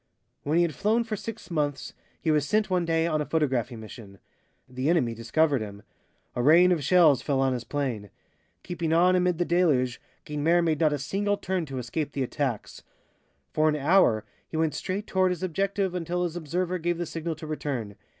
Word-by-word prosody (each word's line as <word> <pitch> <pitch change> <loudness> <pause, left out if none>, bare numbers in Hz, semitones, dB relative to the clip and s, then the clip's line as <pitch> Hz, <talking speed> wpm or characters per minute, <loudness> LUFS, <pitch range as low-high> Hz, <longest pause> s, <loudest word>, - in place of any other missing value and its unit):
When 150 +3 0
he 175 - +5
had 170 -3 -1
flown 220 +7 +1
for 225 -2 -4
six 215 -2 -8
months, 145 -3 -2 0.3
he 160 - 0
was 150 -2 +1
sent 215 +3 +1
one 180 -2 +1
day 165 0 +1
on 155 -2 0
a - - -2
photographing 130 -7 0
mission. 105 -2 -11 0.5
The 130 +3 -2
enemy 145 -9 +2
discovered 135 +4 +1
him. 100 -1 -8 0.5
A 120 - 0
rain 170 +7 +6
of 165 -5 +1
shells 155 -4 +5
fell 140 -3 0
on 135 -1 +2
his 125 -2 -3
plane. 120 -6 -3 0.5
Keeping 170 -2 -2
on 180 +2 +4
amid 180 -2 +2
the 175 - 0
deluge, 145 -9 +1 0.2
Guynemer 160 +4 +2
made 160 -3 +1
not 155 -2 +3
a 145 - 0
single 200 +9 -1
turn 185 -4 -2
to 135 -1 -6
escape 140 +5 -3
the 135 - -1
attacks. 130 -3 -3 0.7
For 155 0 +3
an 150 - +1
hour 145 - +3 0.2
he 160 - -5
went 160 -1 +1
straight 195 +3 -3
toward 185 -2 +2
his 180 -1 -3
objective 195 +2 -1
until 180 0 -2
his 175 -1 -3
observer 175 +3 -2
gave 175 +1 -1
the 175 - -2
signal 165 0 -4
to 155 - -9
return. 135 -9 -4
160 Hz, 200 wpm, -27 LUFS, 135-180 Hz, 0.7 s, rain